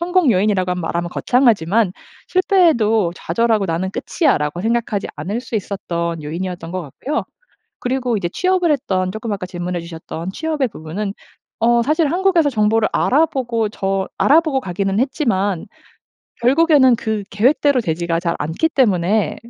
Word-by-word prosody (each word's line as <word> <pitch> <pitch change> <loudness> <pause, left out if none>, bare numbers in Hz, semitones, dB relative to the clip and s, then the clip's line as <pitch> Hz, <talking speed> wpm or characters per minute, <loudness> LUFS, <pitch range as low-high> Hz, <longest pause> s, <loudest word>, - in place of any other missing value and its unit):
성공 350 -5 +2
요인이라고 185 -2 +1
말하면 170 0 -3
거창하지만 220 -6 +2 0.4
실패해도 270 - +3
좌절하고 220 +3 +1
'나는 175 +3 -2
끝이야.'라고 175 - 0
생각하지 225 -2 -1
않을 195 +11 -3
수 235 - -4
있었던 170 -5 -3
요인이었던 170 +2 -5
것 185 0 -3
같고요. 260 - -4 0.5
그리고 250 -2 -1
이제 175 -3 -2
취업을 365 -3 +2
했던 185 -9 -1
쪼끔 220 0 -4
아까 190 -2 -4
질문해 175 0 -4
주셨던 165 +1 -7
취업의 310 -2 -1
부분은 195 +4 -5 0.5
어 235 +1 +4
사실 305 +2 +1
한국에서 355 -4 +2
정보를 215 -1 +2
알아보고 250 -6 +1
저 195 -2 -2
알아보고 310 -1 +4
가기는 195 0 -2
했지만 220 - 0 0.8
결국에는 270 -2 +5
그 220 -2 -2
계획대로 260 +5 +3
되지가 165 -2 -1
잘 170 -1 -1
않기 160 - -1
때문에 205 -4 +1
215 Hz, 365 characters per minute, -19 LUFS, 180-265 Hz, 0.8 s, 결국에는